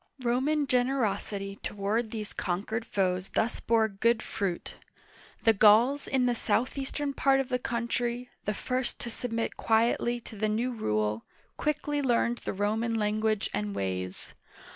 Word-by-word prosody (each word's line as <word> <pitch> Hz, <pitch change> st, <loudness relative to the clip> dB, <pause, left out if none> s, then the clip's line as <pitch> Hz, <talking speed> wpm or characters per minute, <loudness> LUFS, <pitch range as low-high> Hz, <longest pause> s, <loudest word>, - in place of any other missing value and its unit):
Roman 270 Hz, +5 st, +2 dB
generosity 225 Hz, -6 st, 0 dB
toward 205 Hz, +3 st, -1 dB
these 215 Hz, -2 st, -5 dB
conquered 210 Hz, +5 st, -2 dB
foes 185 Hz, -1 st, 0 dB
thus 225 Hz, -, +1 dB
bore 225 Hz, -1 st, +3 dB
good 220 Hz, +3 st, +1 dB
fruit. 190 Hz, -4 st, -3 dB, 0.7 s
The 225 Hz, -, +6 dB
Gauls 225 Hz, +7 st, +5 dB
in 260 Hz, -2 st, +2 dB
the 245 Hz, -, +3 dB
southeastern 270 Hz, +4 st, -1 dB
part 270 Hz, 0 st, +3 dB
of 270 Hz, -1 st, -1 dB
the 250 Hz, -1 st, 0 dB
country 240 Hz, +1 st, -2 dB
— -, -, -42 dB
the 210 Hz, -, -1 dB
first 255 Hz, +3 st, -2 dB
to 235 Hz, -, -4 dB
submit 230 Hz, 0 st, -2 dB
quietly 235 Hz, +1 st, +2 dB
to 225 Hz, -, -10 dB
the 215 Hz, +1 st, 0 dB
new 235 Hz, +4 st, 0 dB
rule, 110 Hz, -, -1 dB, 0.2 s
— -, -, -34 dB
quickly 295 Hz, -1 st, -1 dB
learned 240 Hz, -2 st, +2 dB
the -, -, -4 dB
Roman 220 Hz, +4 st, 0 dB
language 215 Hz, 0 st, +1 dB
and 105 Hz, -1 st, -2 dB
ways. 95 Hz, -1 st, -3 dB
225 Hz, 150 wpm, -29 LUFS, 205-250 Hz, 0.7 s, The